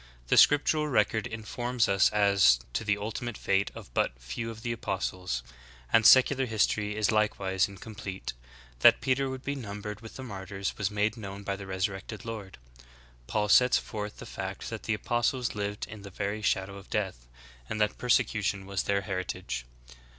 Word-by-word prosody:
'" - - -28
The - - +4
scriptural 150 +1 +5
record 110 -4 +1
informs 120 +2 -1
us 95 0 +4
as 100 - +5
to - - -1
the 105 -1 +1
ultimate 110 +2 -4
fate 100 0 +1
of - - -11
but - - 0
few 65 - -5
of 115 0 -9
the 120 - -1
apostles; 90 - -3 0.5
and 110 -1 +7
secular 130 0 +6
history 105 -1 +1
is 110 0 +2
likewise 100 -3 +1
in 100 -1 -12
complete. 95 -2 -6 0.5
That - - +7
Peter 135 +1 +1
would 130 0 -6
be 140 - -2
numbered 105 -5 -6
with 115 - -11
the 130 - -7
martyrs 100 -3 -5
was 100 -2 -1
made 105 +2 0
known 100 -2 -7
by 100 0 -2
the 95 0 -9
resurrected 95 +2 -3
Lord." 105 - -6 0.7
Paul 105 -1 0
sets 125 +4 +6
forth 105 -1 -5
the - - -9
fact - - -6
that - - -5
the 110 - +1
apostles 120 +3 0
lived 105 0 -3
in 110 -1 -10
the 100 - -9
very 100 +2 -3
shadow 100 -1 0
of 100 - -13
death 95 - -2 0.4
and 110 - -3
that 105 -1 +1
persecution 105 -5 +1
was 100 -2 -1
their 100 0 0
heritage. 95 - -4
105 Hz, 180 wpm, -29 LUFS, 95-115 Hz, 0.7 s, and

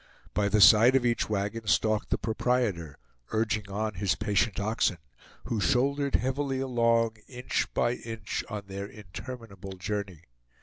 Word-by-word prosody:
By 100 -1 +1
the 105 +1 +3
side 115 +6 +8
of 130 -2 +3
each 120 -2 +1
wagon 105 +2 -2
stalked 110 0 +2
the - - +1
proprietor, 110 - -1 0.3
urging 110 -2 -1
on 105 +2 -2
his 95 -1 0
patient 105 0 0
oxen, 105 -3 0 0.5
who 110 -3 -2
shouldered 140 - +1
heavily 135 +1 0
along, 115 -3 +2
inch 125 -1 -2
by 120 0 +2
inch, 115 -3 -5
on 105 -1 -5
their 100 +1 -6
interminable 105 -1 -9
journey. 95 -3 -4
110 Hz, 140 wpm, -28 LUFS, 100-120 Hz, 0.5 s, side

